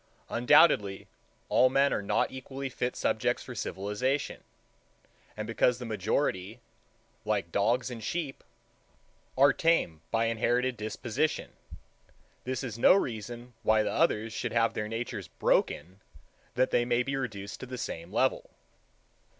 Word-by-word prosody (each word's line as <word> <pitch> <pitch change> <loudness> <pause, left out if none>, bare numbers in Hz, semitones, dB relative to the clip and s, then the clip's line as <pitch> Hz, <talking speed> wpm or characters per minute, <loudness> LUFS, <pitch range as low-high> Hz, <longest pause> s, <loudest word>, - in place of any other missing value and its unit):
Undoubtedly, 115 - +4 0.4
all 130 - +5
men 140 +2 +3
are - - -1
not 105 +2 0
equally 135 +1 -6
fit 125 0 -3
subjects - - 0
for - - -8
civilization; 115 +9 -2 0.9
and - - -3
because 125 -1 +2
the 125 - -7
majority, 110 0 -1 0.6
like 105 -5 -1
dogs 120 +7 +1
and 115 -2 -7
sheep, 155 0 -3 0.9
are 140 +2 +6
tame 165 - +1
by 115 0 +1
inherited 120 +3 +1
disposition, 120 +7 -2 0.9
this 130 0 -3
is 115 -3 -5
no 125 - +7
reason 120 - -3
why 110 0 +3
the - - -1
others 110 -9 +1
should - - -3
have 115 0 +2
their 105 - -3
natures 115 +2 -4
broken 95 +3 0 0.5
that 130 +1 +2
they 120 - +3
may 120 0 +1
be 135 +2 -2
reduced 105 -7 -5
to 130 - -7
the 125 0 -6
same 85 -6 -5
level. 130 +4 +1
120 Hz, 135 wpm, -29 LUFS, 105-130 Hz, 0.9 s, no